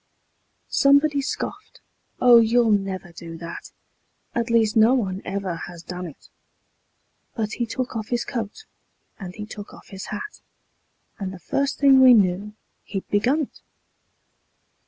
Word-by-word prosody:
Somebody 285 +1 +4
scoffed: 400 +9 -5 0.4
"Oh, 245 -2 +8
you'll 230 0 +3
never 195 -3 -1
do 165 -1 -9
that; 170 0 -8 0.6
At 235 0 -1
least 225 -2 +3
no 225 +3 +6
one 195 -6 -2
ever 195 -2 -3
has 175 -1 -10
done 180 +1 -6
it"; 155 - -14 1.1
But 215 -2 -2
he 235 0 -2
took 255 +2 -4
off 220 -1 -3
his 240 -1 -1
coat 230 - -5 0.5
and 185 -3 -8
he 210 - -6
took 210 -1 -10
off - - -17
his 195 -1 -7
hat, 215 - -7 0.8
And 190 -2 -3
the 190 - -8
first 275 - -1
thing 275 -2 +6
we 255 -2 +9
knew 200 +1 +1 0.3
he'd 195 -2 -5
begun 245 +9 +2
it. 285 - -7
215 Hz, 145 wpm, -23 LUFS, 190-250 Hz, 1.1 s, we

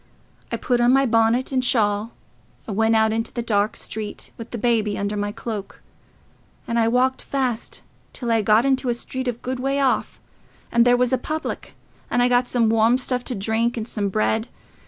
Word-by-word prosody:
I - - -1
put 245 -1 0
on 240 +1 +5
my 270 +1 +4
bonnet 230 +2 +2
and 260 -1 +1
shawl, 215 -3 +1 0.5
and 210 - -5
went 225 +1 +3
out 220 0 +3
into 225 0 -2
the 235 - -4
dark 210 -2 +1
street, 215 -1 -6
with 230 - -9
the 240 - -5
baby 220 -3 +1
under 200 +1 -2
my 205 0 -2
cloak; 210 -2 -7 0.8
and 235 0 0
I 225 - +3
walked 255 +2 +2
fast 255 -4 -3 0.3
till 240 -2 -3
I 225 -1 +3
got 215 +4 +4
into 265 -1 +1
a 240 - +1
street 260 +2 -5
a - - +2
good 250 +2 -5
way 275 +2 0
off, 270 -2 0 0.5
and 235 0 +4
there 245 0 +5
was 250 0 +1
a 260 - +2
public, 315 0 -5 0.3
and 245 - +2
I 245 - +3
got 245 0 +3
some 240 -2 +2
warm 225 +2 +4
stuff 250 -1 -2
to 250 - -3
drink 225 +4 0
and 220 0 -4
some 205 -4 -2
bread. 220 +3 0
235 Hz, 200 wpm, -22 LUFS, 220-250 Hz, 0.8 s, on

